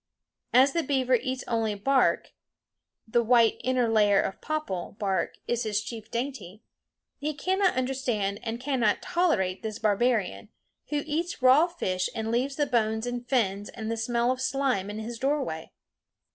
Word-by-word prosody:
As 265 +3 +5
the 335 - +1
beaver 260 -3 0
eats 255 +2 0
only 225 -2 0
bark 265 +6 +2 0.8
the 235 +2 +2
white 235 -1 +4
inner 255 -2 +2
layer 210 -3 +4
of 195 - -2
"popple" 300 - -3
bark 195 -2 -1
is 240 -1 0
his 215 -3 0
chief 220 +1 -7
dainty 230 -6 -5 0.6
he 300 +1 -2
cannot 375 +5 +1
understand 250 -6 -1
and 230 0 -4
cannot 250 -5 +1
tolerate 210 - +1
this 220 -1 -4
barbarian, 220 0 0 0.4
who 295 -1 -1
eats 315 -2 -3
raw 270 +6 +6
fish 185 - -2
and 220 0 -2
leaves 260 +4 0
the 290 - +1
bones 220 -3 0
and 245 0 -5
fins 205 -6 0
and 220 0 -5
the - - 0
smell 235 +2 +1
of 255 0 -3
slime 260 -7 0
in 210 - -5
his 225 +1 -6
doorway. 265 - -2
240 Hz, 160 wpm, -27 LUFS, 215-270 Hz, 0.8 s, raw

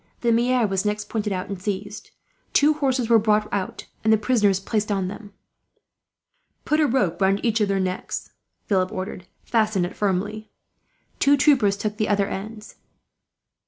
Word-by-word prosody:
The 235 - +2
maire 240 +1 +2
was 195 -2 -1
next 210 0 -2
pointed 210 -2 -2
out, 185 -1 -3
and 195 -2 -6
seized. 205 +1 -5 0.4
Two 295 +2 +5
horses 265 -5 0
were 230 -1 +5
brought 210 0 +2
out, 190 -2 -3 0.2
and 220 - +3
the 220 - +6
prisoners 210 -4 +2
placed 210 +1 -2
on 195 -2 0
them. 205 +1 -9 1.3
"Put 305 - +1
a 305 - +4
rope 215 -9 0
round 195 +1 +3
each 225 -1 +1
of 210 - +3
their 195 0 0
necks," 185 -1 -3 0.3
Philip 185 -2 +1
ordered. 185 -1 -6 0.2
"Fasten 215 -5 +1
it 175 - -7
firmly." 205 +2 -2 0.7
Two 285 0 +4
troopers 250 -9 +3
took 210 0 -3
the 215 -2 0
other 200 -1 +2
ends. 210 +2 -7
210 Hz, 165 wpm, -23 LUFS, 195-230 Hz, 1.3 s, the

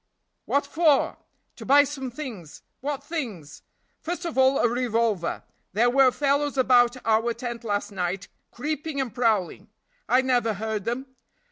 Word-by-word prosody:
"What 285 0 +1
for?" 305 -1 +2 0.4
"To - - -9
buy 285 +2 +6
some 270 -2 -5
things." 240 - -8 0.2
"What 285 0 -4
things?" 220 - -6 0.4
"First 350 +1 -5
of 335 - -4
all, 265 +1 +4
a - - +3
revolver; 230 -6 -1 0.3
there 235 +5 +3
were 270 0 +6
fellows 285 +1 0
about 250 -1 +4
our 225 +1 +2
tent 240 -1 -6
last 205 -1 -2
night, 180 -1 -3 0.2
creeping 300 +2 -4
and 255 -6 -2
prowling." 215 -4 0 0.4
"I 250 +3 +5
never 245 -4 +1
heard 215 -1 -3
them." 240 +3 -2
245 Hz, 145 wpm, -25 LUFS, 220-275 Hz, 0.4 s, buy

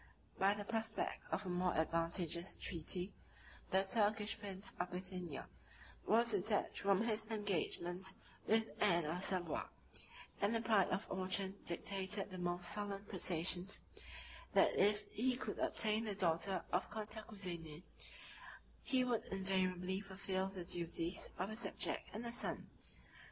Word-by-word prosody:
By 195 +1 +4
the 205 - -5
prospect 225 0 -2
of 205 - -1
a - - -3
more 180 0 0
advantageous 165 +2 +1
treaty, 180 +2 -2 0.6
the 190 +1 +3
Turkish 210 +1 +2
prince 200 -2 -2
of 175 0 -1
Bithynia 180 -4 -6 0.6
was 230 +2 +4
detached 205 +1 +1
from 200 0 +3
his 220 -2 0
engagements 190 -3 -1 0.3
with 220 +1 +4 0.2
Anne 175 -5 +4
of 170 +5 -2
Savoy; 175 -5 +1 0.8
and 205 +3 +2
the 225 - +1
pride 215 -5 +3
of 195 +4 -1
Orchan 190 +1 -1
dictated 195 +3 -2
the 185 - -6
most 175 0 -1
solemn 205 -1 -1
protestations, 180 0 +5 0.7
that - - +5
if 205 +1 +3
he 250 +2 +1
could - - -4
obtain 220 0 +3
the 210 -2 -2
daughter 185 0 +1
of 180 - 0
Cantacuzene, 195 -7 -6 1.0
he 260 -2 +2
would 245 -3 0
invariably 190 -1 -1
fulfil 190 -1 -2
the 190 -2 -6
duties 170 +1 +1
of 185 +4 -2
a - - -4
subject 235 - -1
and 220 +3 -6
a 235 - -2
son. 240 - -1
190 Hz, 135 wpm, -38 LUFS, 180-210 Hz, 1.0 s, protestations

